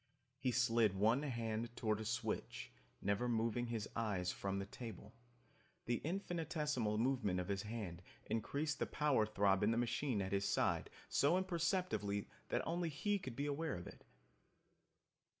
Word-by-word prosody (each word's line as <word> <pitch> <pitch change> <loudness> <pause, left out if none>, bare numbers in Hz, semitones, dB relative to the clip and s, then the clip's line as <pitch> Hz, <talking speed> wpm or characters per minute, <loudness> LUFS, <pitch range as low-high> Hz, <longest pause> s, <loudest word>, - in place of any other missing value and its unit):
He 130 - +1
slid 115 -4 +4
one 110 +7 +4
hand 115 -4 -2
toward 110 -2 +1
a 110 - -4
switch, 115 -1 -2 0.3
never 100 +5 +1
moving 115 +1 +1
his 115 -2 -2
eyes 100 -6 0
from 100 0 -2
the 100 - -2
table. 110 0 -8 0.7
The 120 0 +1
infinitesimal 155 - -1
movement 115 -6 +2
of 90 - -3
his 100 -1 0
hand 105 -5 -5 0.2
increased 145 +7 -1
the - - +1
power 145 -8 +3
throb 100 -2 +3
in 105 - +4
the 115 - +2
machine 120 0 +1
at 95 -1 -1
his 100 0 +1
side - - +2 0.2
so 150 +6 +4
imperceptibly 170 - 0 0.2
that - - 0
only 170 0 0
he 200 +7 0
could 130 -11 -6
be 140 - -1
aware 145 +1 -1
of 85 - -6
it. - - -11
115 Hz, 155 wpm, -39 LUFS, 105-145 Hz, 0.7 s, slid